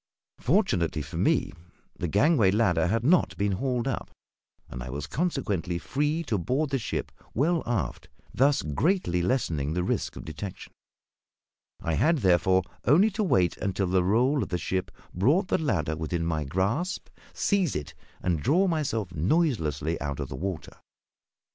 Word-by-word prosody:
Fortunately 80 -3 +1
for - - -7
me, - - +2 0.4
the 90 - -3
gangway 110 - +4
ladder 90 -6 +2
had 115 +5 0
not 170 +7 +3
been 100 0 +1
hauled 125 +5 -1
up, 135 - -3 0.6
and 65 - -7
I - - -6
was 70 +2 -4
consequently 105 - -1
free 150 - -1
to 110 - -1
board 135 - -1
the 135 - +1
ship 110 - -3 0.2
well 165 +6 +2
aft, 95 - -2 0.2
thus 140 +2 +3
greatly 90 - +1
lessening 80 - 0
the 90 +1 0
risk - - -1
of - - -8
detection; 90 +5 -7 1.1
I 80 - -1
had, 160 - +3
therefore, 95 - +3 0.2
only 180 - +5
to 215 +2 -1
wait 90 - +2
until 95 0 -1
the 90 0 +2
roll 125 +9 +2
of - - -3
the 90 - -1
ship 95 +2 -2 0.2
brought 145 - +2
the - - +2
ladder 80 - 0
within 80 +2 -2
my 80 -3 -1
grasp, 100 - -1 0.2
seize 195 -7 +1
it, 75 -1 -4 0.3
and 85 -4 0
draw 175 - +3
myself 115 - -1
noiselessly 85 - 0
out 70 -2 -3
of - - -4
the - - -5
water. 90 +3 -5
100 Hz, 160 wpm, -27 LUFS, -, 1.1 s, only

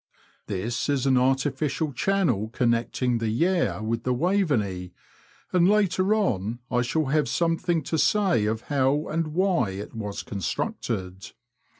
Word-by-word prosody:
This 110 +7 -2
is 140 -2 +1
an 135 -1 +4
artificial 135 +3 0
channel 130 - +1
connecting 120 0 0
the 115 -1 -1
Yare 170 +1 +1
with 115 +1 -1
the 125 +1 0
Waveney, 120 - 0 0.6
and 180 0 +4
later 200 -1 +2
on 115 - 0
I 125 -1 +2
shall 155 +6 0
have 145 -2 +1
something 165 +1 0
to 160 +3 -1
say 190 - +3
of 110 +1 -1
how 140 +2 +1
and 165 0 -1
why 180 - +2
it 95 +2 -7
was 105 -3 -5
constructed. 95 -2 -4
130 Hz, 135 wpm, -25 LUFS, 110-165 Hz, 0.6 s, an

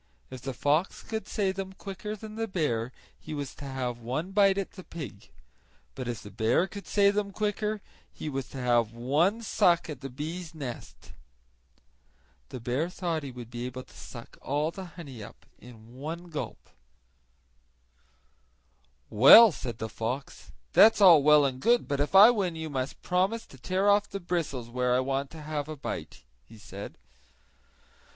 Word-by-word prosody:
If 130 -1 -8
the 135 0 -4
fox 150 +8 0
could 220 -1 -5
say 195 -3 0
them 190 0 -6
quicker 200 +2 -6
than 215 0 -10
the 225 +1 -3
bear 130 - -1 0.3
he 155 - -7
was 140 -2 -5
to 145 - -10
have 130 -3 -3
one 130 +10 -3
bite 195 -1 +4
at 195 - -3
the 185 - -11
pig; 155 - -9 0.6
but 130 -2 -6
if 120 -2 -4
the 105 - -10
bear 110 - +2
could 200 +1 -9
say 200 -1 +4
them 205 -1 -2
quicker 210 +1 -2 0.3
he - - -8
was 135 -3 -4
to - - -9
have 120 -3 +1
one 155 - +1
suck 175 -7 +2
at 140 -3 -8
the 135 - -6
bee's 160 +5 -6
nest. 130 -6 -8 1.4
The - - -7
bear 125 +8 -1
thought 170 -3 -2
he 140 - -6
would 120 -2 -10
be 120 +1 -4
able 130 0 -7
to - - -21
suck 120 -1 -11
all 150 +4 -1
the 190 +1 -8
honey 135 -9 -9
up - - -13 0.2
at 125 +2 -12
one 140 +10 -8
gulp. 155 -3 -6 2.4
"Well 140 - +9
said 120 -7 -6
the 110 - -4
fox, 125 +5 -5 0.2
"that's 225 0 +7
all 175 -7 +8
well 150 0 +6
and 130 -2 -2
good 240 - +3
but 140 -1 -1
if 145 +6 -1
I 210 +5 +10
win 190 -7 -1
you 160 -1 -5
must 130 0 -4
promise 190 +6 0
to 135 - -16
tear 190 +8 0
off 205 0 +4
the 200 - -5
bristles 165 -9 -3
where 125 +1 0
I - - +3
want 135 +1 -1
to 160 -2 -10
have 150 -1 -4
a 155 - -5
bite," 80 - -6 0.2
he 90 +12 -16
said. 100 -1 -9
150 Hz, 175 wpm, -28 LUFS, 125-190 Hz, 2.4 s, I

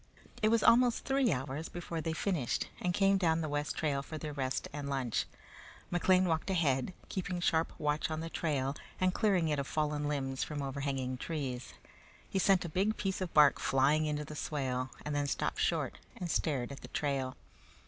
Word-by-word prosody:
It 215 - +4
was 230 0 +3
almost 245 0 +5
three 270 -4 +3
hours 140 +3 -3
before 170 -2 -4
they 160 - -2
finished 160 - -1
and 180 - 0
came 195 +1 +3
down 165 -3 +2
the 155 - -2
west 145 0 -2
trail 145 -3 0
for 155 +3 -7
their 150 -1 -5
rest 135 -2 -2
and 145 -1 -4
lunch. 130 -4 0 0.6
McLean 185 +1 +4
walked 160 +2 0
ahead, 155 -3 +1
keeping 180 -1 -3
sharp 165 -1 +2
watch 150 +1 0
on 155 0 -2
the 165 - -4
trail 140 -4 -1 0.2
and 185 0 +2
clearing 190 -6 +2
it 150 -1 +1
of 140 - -2
fallen 150 -1 0
limbs 135 -3 -1
from 145 -2 -4
overhanging 135 -2 -2
trees. 130 - -4 0.5
He 195 - -1
sent 190 -2 +4
a - - -2
big 195 +7 0
piece 195 -1 -2
of 185 - -2
bark 150 -2 +7
flying 145 +4 +3
into 150 0 -2
the 150 - -8
swale, 130 -4 -2 0.2
and 150 - -2
then 145 0 0
stopped - - -1
short - - 0 0.2
and 175 -2 -3
stared 140 -5 0
at 140 - -8
the - - -9
trail. 135 -3 -2
150 Hz, 190 wpm, -33 LUFS, 140-175 Hz, 0.6 s, bark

